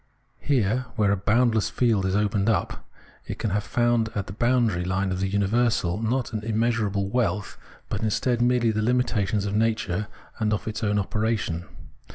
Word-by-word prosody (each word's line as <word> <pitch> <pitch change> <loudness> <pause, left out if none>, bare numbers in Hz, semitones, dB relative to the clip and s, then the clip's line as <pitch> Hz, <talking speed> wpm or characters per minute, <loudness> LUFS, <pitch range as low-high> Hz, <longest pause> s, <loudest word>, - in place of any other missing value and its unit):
Here, 125 -2 0
where 105 -4 +2
a - - +3
boundless 110 +2 +2
field 110 -6 +1
is 95 - 0
opened 105 0 +1
up, 110 - -1 0.4
it - - -5
can 110 - -2
have 105 +1 0
found 120 -1 +1
at 100 -2 -2
the 95 - -8
boundary 120 -5 +1
line 95 +1 -1
of 90 - -2
the 95 - 0
universal, 100 -1 +1
not 120 +1 -1
an 105 -1 -3
immeasurable 110 -3 0
wealth, 100 -3 -1 0.3
but - - -3
instead, 120 +3 0
merely 120 -1 +3
the 110 0 -1
limitations 110 -4 +1
of 100 0 -2
nature 110 -3 0 0.3
and 105 -1 +1
of 105 - -3
its 110 +1 -4
own 105 -1 +1
operation. 105 -4 -1
110 Hz, 175 wpm, -25 LUFS, 100-115 Hz, 0.4 s, a